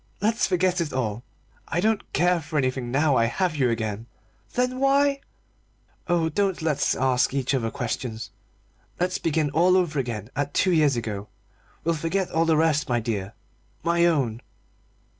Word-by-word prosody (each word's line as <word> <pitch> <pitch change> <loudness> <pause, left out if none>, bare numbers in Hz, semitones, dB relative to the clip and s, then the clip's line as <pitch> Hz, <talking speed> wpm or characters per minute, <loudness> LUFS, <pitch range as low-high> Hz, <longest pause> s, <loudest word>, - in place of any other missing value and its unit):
Let's 220 +4 +1
forget 180 -1 +1
it 155 -3 -2
all. 120 -3 -2 0.4
I 165 - -1
don't 215 +2 0
care 175 -1 +2
for 155 +1 -4
anything 130 -2 0
now 140 +2 +2
I 115 - +4
have 170 +8 -1
you 130 -4 +2
again." 110 -1 -3 0.5
"Then 250 +1 0
why 275 +1 +3 0.4
" - - -38
"Oh, 170 -2 +2
don't 190 +1 -1
let's 155 -3 +1
ask 130 0 +1
each 135 -1 0
other 120 -4 0
questions 115 -1 -4 0.7
let's 180 +1 0
begin 155 -2 0
all 175 +5 +4
over 165 -6 0
again 115 -3 -4
at 145 +1 -2
two 185 - +3
years 150 -5 +3
ago. 105 -3 -4 0.6
We'll 170 - +1
forget 165 +4 -1
all 165 +1 +2
the 160 -1 +3
rest 155 -2 +2
my 120 -1 +2
dear 105 -3 -4 0.5
my 170 +1 +3
own!" 130 -9 0
150 Hz, 165 wpm, -25 LUFS, 120-175 Hz, 0.7 s, I